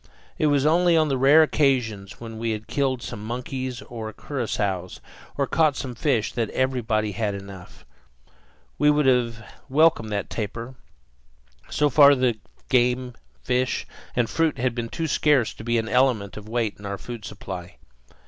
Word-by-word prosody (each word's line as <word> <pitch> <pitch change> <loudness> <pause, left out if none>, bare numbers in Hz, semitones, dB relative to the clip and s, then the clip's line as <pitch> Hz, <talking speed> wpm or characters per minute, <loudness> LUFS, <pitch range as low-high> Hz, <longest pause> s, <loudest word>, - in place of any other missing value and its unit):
It 155 - +3
was 145 -1 +2
only 170 +2 +4
on 155 -1 +3
the 135 - +1
rare 145 +4 +7
occasions 115 -10 0
when 115 -1 -8
we 115 -1 -1
had 110 0 -6
killed 130 +1 -1
some 105 -3 -6
monkeys 125 +2 -4
or 110 -2 -7
curassows, 105 -9 -3 0.4
or 140 - +2
caught 155 0 +2
some 130 -2 -5
fish, 120 -3 0
that 115 -3 -1
everybody 120 -5 0
had 105 0 -2
enough. 95 -2 -11 0.9
We 150 - +5
would 150 -1 +3
have 120 -3 +1 0.2
welcomed 140 -6 +3
that 100 -1 -3
tapir. 115 +3 -4 1.0
So 150 -1 +1
far 140 +1 +7
the 125 -4 +1 0.3
game, 125 0 +2 0.3
fish, 125 - 0 0.3
and 120 -2 +2
fruit 165 +6 0
had 125 0 0
been 115 -1 -4
too 165 - -3
scarce 145 -5 +2
to - - -11
be 120 +1 +1
an 110 -1 -1
element 120 -6 +1
of 105 0 -9
weight 115 -3 -1
in 105 - -10
our 100 0 -3
food 120 +2 -8
supply. 95 -4 -8
120 Hz, 165 wpm, -24 LUFS, 110-135 Hz, 1.0 s, rare